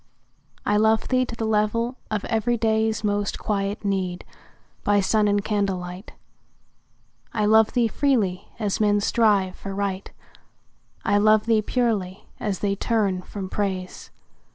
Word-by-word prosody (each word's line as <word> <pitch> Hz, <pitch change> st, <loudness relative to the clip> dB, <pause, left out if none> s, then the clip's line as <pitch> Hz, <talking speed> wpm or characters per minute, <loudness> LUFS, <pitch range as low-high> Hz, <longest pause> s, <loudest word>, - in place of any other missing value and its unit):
I 205 Hz, -, +2 dB
love 220 Hz, +1 st, +2 dB
thee 255 Hz, 0 st, +2 dB
to 235 Hz, -, -6 dB
the 225 Hz, -, -3 dB
level 220 Hz, +3 st, 0 dB
of 215 Hz, -2 st, -2 dB
everyday's 220 Hz, -1 st, 0 dB
Most 205 Hz, -1 st, -1 dB
quiet 200 Hz, 0 st, -2 dB
need, 185 Hz, -3 st, -2 dB, 0.6 s
by 205 Hz, 0 st, +3 dB
sun 210 Hz, +2 st, +2 dB
and 205 Hz, 0 st, +1 dB
candlelight. 195 Hz, -2 st, -3 dB, 1.2 s
I 210 Hz, -2 st, +1 dB
love 220 Hz, +1 st, +4 dB
thee 240 Hz, -2 st, +3 dB
freely, 225 Hz, -8 st, 0 dB
as 210 Hz, -2 st, -1 dB
men 205 Hz, -1 st, +3 dB
strive 205 Hz, -3 st, +2 dB
for 195 Hz, -1 st, -7 dB
Right; 200 Hz, -1 st, -3 dB, 0.9 s
I 205 Hz, 0 st, +3 dB
love 215 Hz, 0 st, +4 dB
thee 225 Hz, -2 st, +3 dB
purely, 210 Hz, -5 st, -1 dB
as 200 Hz, -4 st, -3 dB
they 200 Hz, -1 st, 0 dB
turn 200 Hz, -4 st, 0 dB
from 190 Hz, +1 st, -7 dB
Praise. 185 Hz, -2 st, -4 dB
210 Hz, 135 wpm, -24 LUFS, 195-220 Hz, 1.2 s, love